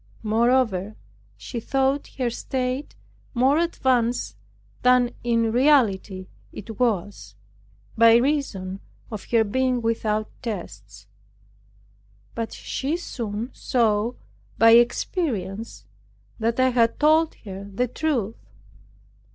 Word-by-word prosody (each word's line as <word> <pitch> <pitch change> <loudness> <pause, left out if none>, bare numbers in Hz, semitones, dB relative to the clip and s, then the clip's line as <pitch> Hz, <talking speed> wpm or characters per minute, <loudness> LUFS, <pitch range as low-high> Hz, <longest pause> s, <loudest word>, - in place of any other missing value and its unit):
Moreover, 220 -3 +1 0.4
she 100 - -6
thought 270 +4 0
her 250 -3 0
state 255 +3 -3 0.4
more 265 +5 +3
advanced 245 - 0 0.5
than 250 -1 +4
in 230 -1 +1
reality 225 -8 +2 0.3
it 220 +2 -9
was, 195 - -1 0.6
by 230 0 +7
reason 235 -8 0 0.3
of 215 -3 -6
her 230 -2 +3
being 255 +4 0
without 220 -2 -1
tests; 105 - -7 1.3
but 230 -1 -4
she 290 +5 -3
soon 230 -7 -5
saw 225 -1 +1 0.4
by 225 +1 +6
experience 230 - +1 0.5
that 230 +2 0
I 260 0 +4
had 235 -2 +2
told 315 +2 +3
her 195 -1 -9
the 245 +6 0
truth. 245 -6 -2
230 Hz, 100 wpm, -24 LUFS, 210-255 Hz, 1.3 s, by